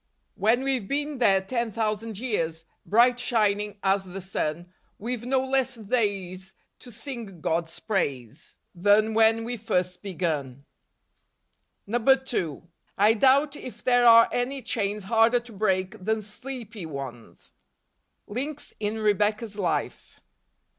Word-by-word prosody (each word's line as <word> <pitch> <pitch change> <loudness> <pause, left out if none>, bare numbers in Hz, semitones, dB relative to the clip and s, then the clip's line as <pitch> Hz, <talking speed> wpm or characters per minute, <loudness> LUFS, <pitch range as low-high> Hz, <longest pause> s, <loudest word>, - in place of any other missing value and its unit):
" - - -47
When 240 +4 +4
we've 260 -7 -1
been 290 +1 -2
there 195 -5 +4
ten 235 +4 -2
thousand 220 0 -2
years, 165 -9 -2 0.2
Bright 240 +3 +4
shining 210 -3 +1
as 195 0 +2
the 190 +1 -8
sun, 175 -2 -4 0.2
We've 235 +2 -4
no 265 0 +2
less 265 -1 0
days 195 -5 -2 0.2
to 250 - -12
sing 230 -5 -7
God's 165 +1 -2
praise. 140 - -3 0.2
Than 205 +4 +3
when 225 0 +4
we 240 +1 -4
first 180 -5 -1
begun." 155 -9 -3 1.2
2. 240 - +1 0.3
I 210 +3 +5
doubt 275 +5 +3
if 235 -6 -9
there 245 -1 +4
are 230 0 +8
any 255 +2 -2
chains 210 -2 -2
harder 225 +4 +3
to 240 -1 -14
break 190 0 -1
than 220 +1 0
sleepy 220 -3 -8
ones. 135 -6 -9 0.7
Links 275 +7 -5
in 210 +1 -2
Rebecca's 210 0 0
Life. 175 -4 -3
215 Hz, 125 wpm, -26 LUFS, 190-240 Hz, 1.2 s, are